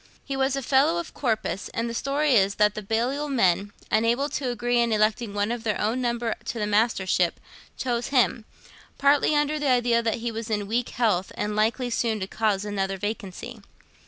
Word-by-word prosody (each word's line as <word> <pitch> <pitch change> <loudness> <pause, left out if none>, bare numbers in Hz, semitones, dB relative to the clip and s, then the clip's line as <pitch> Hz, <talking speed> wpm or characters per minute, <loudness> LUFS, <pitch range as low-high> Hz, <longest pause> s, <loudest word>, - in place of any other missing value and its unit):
He 275 - -3
was 270 0 +1
a 275 - -3
fellow 280 +6 +3
of 340 - -7
Corpus, 220 -6 -2
and 230 +1 -1
the 230 - -4
story 280 +4 +1
is 200 -3 +3
that 210 0 +3
the 215 - -5
Balliol 245 +8 -1
men, 205 -6 +2 0.2
unable 235 +6 +2
to 275 -2 -2
agree 245 0 0
in 235 -1 +2
electing 215 +1 +1
one 205 +2 0
of 240 -1 -4
their 215 -3 -1
own 225 +5 0
number 235 -2 -1
to - - -4
the 210 - -1
Mastership, 205 -5 +1 0.4
chose 240 -2 -1
him, 245 -4 +2 0.5
partly 285 +2 +3
under 295 +1 +1
the 290 -2 0
idea 240 -2 +3
that 230 -1 0
he 235 0 -3
was 225 0 -5
in 210 -2 -1
weak 230 +4 -1
health 210 -6 0
and 210 0 -2
likely 235 +4 +1
soon 225 -2 0
to 190 - -2
cause 205 0 -1
another 195 -2 -2
vacancy. 210 +2 -5
230 Hz, 195 wpm, -25 LUFS, 210-255 Hz, 0.5 s, fellow